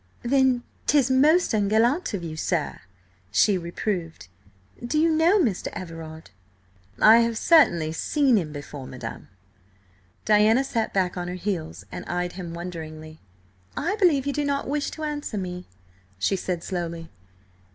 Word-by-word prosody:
"Then 260 Hz, -1 st, +2 dB, 0.2 s
'tis 275 Hz, -3 st, +3 dB
most 300 Hz, +6 st, +4 dB
ungallant 220 Hz, -, +2 dB
of 180 Hz, -, -5 dB
you, 160 Hz, -2 st, -5 dB
sir!" 155 Hz, -1 st, -2 dB, 0.5 s
she 190 Hz, -, +4 dB
reproved. 170 Hz, -, -4 dB, 0.5 s
"Do 245 Hz, +6 st, -1 dB
you 325 Hz, +2 st, +4 dB
know 325 Hz, +6 st, +4 dB
Mr. 235 Hz, -, 0 dB
Everard?" 165 Hz, -, -8 dB, 0.7 s
"I 220 Hz, +2 st, +8 dB
have 230 Hz, -1 st, +1 dB
certainly 175 Hz, -, +4 dB
seen 270 Hz, -, +2 dB
him 170 Hz, -7 st, 0 dB
before, 145 Hz, -2 st, -8 dB
madam." 120 Hz, -3 st, -8 dB, 1.0 s
Diana 215 Hz, +4 st, +4 dB
sat 230 Hz, -4 st, -2 dB
back 185 Hz, -2 st, 0 dB
on 175 Hz, 0 st, -3 dB
her 180 Hz, -, -4 dB
heels 165 Hz, -, -4 dB
and -, -, -6 dB
eyed 180 Hz, 0 st, -2 dB
him 175 Hz, -2 st, -7 dB
wonderingly. 160 Hz, -2 st, -8 dB, 0.6 s
"I 350 Hz, +8 st, 0 dB
believe 320 Hz, -10 st, +3 dB
you 285 Hz, -, -1 dB
do 295 Hz, -, -1 dB
not 280 Hz, 0 st, -1 dB
wish 290 Hz, +1 st, -1 dB
to 315 Hz, -, -8 dB
answer 295 Hz, -7 st, -3 dB
me," 180 Hz, -1 st, -5 dB, 0.5 s
she 95 Hz, -, +1 dB
said 180 Hz, -2 st, -3 dB
slowly. 170 Hz, -2 st, -5 dB
195 Hz, 145 wpm, -25 LUFS, 165-270 Hz, 1.0 s, I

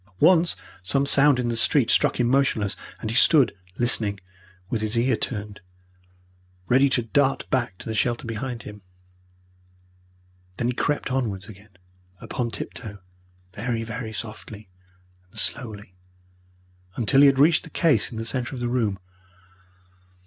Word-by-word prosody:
Once 175 Hz, -1 st, +4 dB, 0.3 s
some 135 Hz, +10 st, +1 dB
sound 140 Hz, 0 st, +5 dB
in 120 Hz, -1 st, -1 dB
the 115 Hz, -, -1 dB
street 125 Hz, +1 st, +3 dB
struck -, -, +2 dB
him 120 Hz, -, +2 dB
motionless, 125 Hz, -6 st, +1 dB, 0.3 s
and 110 Hz, -, -3 dB
he -, -, -4 dB
stood 135 Hz, -4 st, +5 dB, 0.2 s
listening, 110 Hz, -4 st, +1 dB, 0.5 s
with 110 Hz, +2 st, -2 dB
his 110 Hz, +1 st, -1 dB
ear 125 Hz, +1 st, +2 dB
turned, 105 Hz, -3 st, -5 dB, 1.1 s
ready 135 Hz, +3 st, +4 dB
to 125 Hz, -2 st, +1 dB
dart 135 Hz, +4 st, 0 dB
back 120 Hz, -9 st, -1 dB
to -, -, -10 dB
the 110 Hz, -, -3 dB
shelter 120 Hz, +2 st, -1 dB
behind 115 Hz, +2 st, -5 dB
him. 105 Hz, 0 st, -10 dB, 1.8 s
Then 120 Hz, -, -1 dB
he -, -, 0 dB
crept 145 Hz, +2 st, -1 dB
onwards 105 Hz, -7 st, -2 dB
again 100 Hz, -2 st, -15 dB, 0.4 s
upon 120 Hz, +4 st, -4 dB
tiptoe, 110 Hz, -2 st, -7 dB, 0.6 s
very, 115 Hz, +2 st, -3 dB
very 115 Hz, 0 st, -6 dB
softly 110 Hz, -2 st, -8 dB, 0.6 s
and -, -, -15 dB
slowly, 105 Hz, -6 st, -1 dB, 1.0 s
until 120 Hz, +4 st, +3 dB
he 145 Hz, -, +8 dB
had 135 Hz, -1 st, +3 dB
reached 160 Hz, +4 st, +4 dB
the -, -, -11 dB
case 160 Hz, -3 st, +2 dB
in 115 Hz, -, -7 dB
the 115 Hz, -, -4 dB
centre 125 Hz, +2 st, -3 dB
of -, -, -6 dB
the 120 Hz, -, -2 dB
room. 115 Hz, -6 st, 0 dB
120 Hz, 150 wpm, -24 LUFS, 110-135 Hz, 1.8 s, he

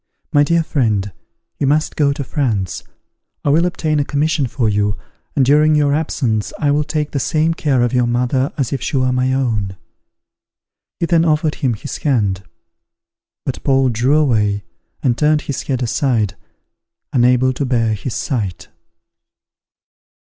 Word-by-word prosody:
My 145 Hz, -, +5 dB
dear 165 Hz, +3 st, +2 dB
friend, 110 Hz, -10 st, 0 dB, 0.5 s
you 140 Hz, -, +1 dB
must 150 Hz, +2 st, +1 dB
go 145 Hz, -2 st, +2 dB
to 140 Hz, 0 st, -3 dB
France; 115 Hz, -, -2 dB, 0.6 s
I -, -, +2 dB
will 165 Hz, +5 st, +3 dB
obtain 155 Hz, -3 st, -1 dB
a -, -, +2 dB
commission 145 Hz, 0 st, 0 dB
for 120 Hz, -1 st, -1 dB
you, 105 Hz, -1 st, +1 dB, 0.4 s
and 135 Hz, -, +3 dB
during 150 Hz, +3 st, +4 dB
your 145 Hz, -1 st, +3 dB
absence 125 Hz, -8 st, -1 dB
I 145 Hz, -2 st, +1 dB
will 150 Hz, +1 st, +2 dB
take 150 Hz, 0 st, -2 dB
the 140 Hz, -, -1 dB
same 155 Hz, +4 st, +1 dB
care 140 Hz, -6 st, +1 dB
of 120 Hz, -, 0 dB
your 125 Hz, -1 st, +2 dB
mother 125 Hz, +4 st, 0 dB
as 135 Hz, -4 st, -1 dB
if 135 Hz, -, -2 dB
she -, -, -1 dB
were 130 Hz, -1 st, +2 dB
my 125 Hz, +1 st, +1 dB
own." 110 Hz, -8 st, -1 dB, 1.2 s
He -, -, +1 dB
then 165 Hz, -1 st, +3 dB
offered 155 Hz, -1 st, +1 dB
him 130 Hz, -5 st, +1 dB
his 140 Hz, -, -6 dB
hand; 105 Hz, -10 st, 0 dB, 1.0 s
but -, -, -4 dB
Paul 135 Hz, -1 st, +3 dB
drew 125 Hz, +5 st, +2 dB
away 105 Hz, -9 st, +1 dB, 0.4 s
and 125 Hz, -4 st, +2 dB
turned 150 Hz, +2 st, +2 dB
his 140 Hz, -, -4 dB
head 130 Hz, -2 st, -2 dB
aside, 115 Hz, -4 st, 0 dB, 0.8 s
unable 125 Hz, +1 st, +3 dB
to 135 Hz, -, -3 dB
bear 115 Hz, -4 st, +1 dB
his 110 Hz, +4 st, -4 dB
sight. 105 Hz, -9 st, -3 dB
135 Hz, 160 wpm, -18 LUFS, 120-150 Hz, 1.2 s, My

